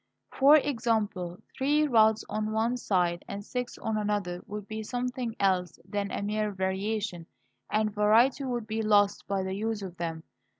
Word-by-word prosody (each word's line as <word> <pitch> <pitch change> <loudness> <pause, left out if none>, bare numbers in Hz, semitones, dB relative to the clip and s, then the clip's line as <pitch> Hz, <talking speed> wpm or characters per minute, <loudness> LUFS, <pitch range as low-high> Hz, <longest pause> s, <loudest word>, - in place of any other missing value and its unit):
For 280 +3 +6
example, 220 - 0 0.2
three 295 +3 +2
rods 220 -5 +4
on 215 0 -2
one 225 +3 +1
side 180 -7 0
and 200 0 -6
six 250 +1 -4
on 220 -1 -2
another 205 -4 -1
would 205 0 -6
be 220 0 -5
something 245 +1 -3
else 185 -2 +1
than 200 0 -2
a - - -3
mere 210 +1 0
variation, 190 -1 -2 0.4
and 215 0 +1
variety 225 +7 +4
would 240 -3 -2
be 220 +1 -2
lost 205 -2 +3
by 195 -1 0
the 190 0 -3
use 215 +1 -2
of 180 -2 -7
them. 165 -2 -4
215 Hz, 165 wpm, -28 LUFS, 195-225 Hz, 0.4 s, For